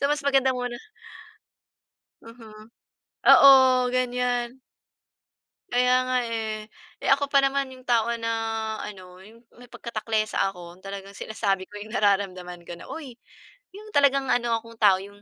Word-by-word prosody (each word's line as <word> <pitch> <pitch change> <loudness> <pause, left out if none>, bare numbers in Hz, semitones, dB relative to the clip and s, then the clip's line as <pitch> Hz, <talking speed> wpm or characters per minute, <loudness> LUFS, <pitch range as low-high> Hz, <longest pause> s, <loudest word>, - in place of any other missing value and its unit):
So, 280 - +1
mas 295 -1 -1
maganda 270 -2 +3
muna 245 -1 -4 1.5
Mhm, 220 -2 -14 0.6
oo, 275 - +9 0.4
ganyan. 250 0 -1 1.1
Kaya 250 +1 +3 0.2
nga, 255 - +1
eh. 220 -2 -4 0.3
Eh, - - -3
ako 280 0 -1
pa 280 - +4
naman 275 0 -1
'yong 255 0 -14
tao 235 -2 +2
na 230 0 -3 0.5
ano, 185 -3 -10
'yong 225 +5 -17 0.2
may 245 - -15
pagka-taklesa 220 -1 -3
ako. 175 -1 -12
Talagang 195 0 -8
sinasabi 195 -3 -3
ko 205 - -10
yung 215 +2 -10
nararamdaman 185 -5 -1
ko - - -8
na, 170 - -12
"Uy!" 290 -6 -8 0.6
'Yong 425 +2 -12
talagang 275 -1 +3
ano 240 -1 +1
akong 230 0 -12
tao, 195 -3 +6
yung 200 +1 -13
230 Hz, 140 wpm, -25 LUFS, 200-255 Hz, 1.5 s, oo